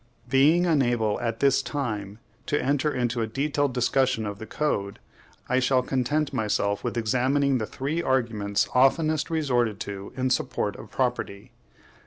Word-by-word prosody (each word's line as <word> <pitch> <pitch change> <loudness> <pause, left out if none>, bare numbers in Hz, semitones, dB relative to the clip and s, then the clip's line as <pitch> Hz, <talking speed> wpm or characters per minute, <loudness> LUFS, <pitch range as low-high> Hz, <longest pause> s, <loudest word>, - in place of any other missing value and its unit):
Being 150 +7 +4
unable, 120 -9 +1
at 115 -1 -3
this 140 -1 +4
time, 105 -8 -4 0.3
to 145 - +1
enter 145 +2 +1
upon 120 -1 -1
a - - -2
detailed 140 +2 -1
discussion 125 -2 +1
of 100 -1 -5
the 110 - -8
Code, 100 -10 -2 0.5
I 125 +1 +2
shall 130 0 +2
content 135 +4 -1
myself 100 -2 0
with 120 -1 -3
examining 130 +4 +1
the 110 - -3
three 145 +6 -3
arguments 115 -8 0
oftenest 150 +4 +3
resorted 125 -10 0
to 100 -1 -6
in 130 0 0
support 125 - -1
of - - -11
property. 100 +5 -2
125 Hz, 150 wpm, -26 LUFS, 110-140 Hz, 0.5 s, Being